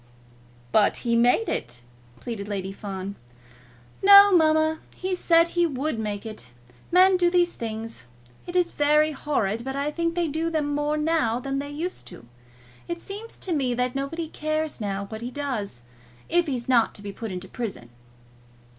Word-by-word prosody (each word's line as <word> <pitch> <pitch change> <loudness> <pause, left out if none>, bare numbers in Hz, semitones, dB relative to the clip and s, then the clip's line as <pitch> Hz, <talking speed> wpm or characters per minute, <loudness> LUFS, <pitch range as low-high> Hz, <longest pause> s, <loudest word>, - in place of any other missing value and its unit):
"But 210 -2 +3
he 235 -1 +2
made 245 - +3
it!" 120 +1 -4 0.4
pleaded 220 -4 -6
Lady 195 -2 -3
Fawn. 195 -1 -6 0.8
"No, 400 +1 +9
mamma, 315 -1 +3 0.2
he 375 0 -3
said 335 -2 +4
he 345 0 +2
would 280 -3 -2
make 210 -1 -4
it. 215 - -8 0.4
Men 370 +1 +6
do 350 -1 +3
these 350 -1 +2
things. 225 - -6 0.4
It 350 - -7
is 355 -1 +2
very 300 +1 +3
horrid, 230 -8 -1
but 265 +1 -4
I 285 +2 -1
think 335 +1 -1
they 345 -1 +1
do 320 +2 -1
them 300 -3 -1
more 295 +1 0
now 300 -7 +1
than 275 +1 -3
they 285 +1 -5
used 325 +5 -5
to. - - -12 0.6
It 340 0 -4
seems 415 +5 -8
to 365 - -3
me 260 -5 0
that 250 0 0
nobody 280 +5 -3
cares 310 -3 -3
now 200 -1 -2
what 220 +2 -8
he 240 - -4
does, 240 - -4 0.4
if 345 +1 +2
he's 250 -4 -3
not 240 -3 +3
to 205 - -12
be 200 - -5
put 220 +2 -6
into 185 +1 -6
prison." 195 - -6
280 Hz, 175 wpm, -25 LUFS, 220-330 Hz, 0.8 s, No